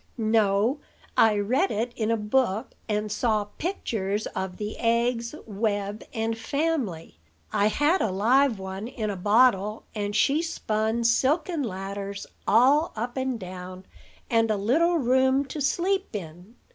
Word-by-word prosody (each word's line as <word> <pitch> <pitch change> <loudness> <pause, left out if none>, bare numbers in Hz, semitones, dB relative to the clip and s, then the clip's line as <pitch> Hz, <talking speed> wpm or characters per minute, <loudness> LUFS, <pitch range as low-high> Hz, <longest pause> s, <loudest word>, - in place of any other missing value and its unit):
"No; 220 +3 +2 0.4
I 220 -1 +5
read 250 - +1
it 230 +3 -2
in 220 -1 -1
a 230 - +2
book, 215 +1 0 0.2
and 210 0 -1
saw 215 -1 +1 0.2
pictures 215 - -2
of 190 -1 -4
the 210 0 -4
eggs, 235 +2 0
web, 205 -1 -2
and 225 0 -1
family. 240 - -2 0.3
I 205 - +3
had 295 - +2
a - - +1
live 235 +6 +3
one 190 +2 -6
in 215 -4 -3
a - - -4
bottle; 210 +1 +3
and 205 -1 -3
she 285 +7 +3
spun 220 -8 -1
silken 290 +8 +2
ladders 200 -2 -5 0.2
all 275 - +4
up 235 +3 -4
and 260 -3 -2
down, 185 0 -8 0.4
and 225 -1 +2
a 215 - +1
little 320 - +2
room 260 0 +3
to 290 +2 -6
sleep 380 - 0
in. 180 +4 -8
225 Hz, 145 wpm, -26 LUFS, 205-260 Hz, 0.4 s, I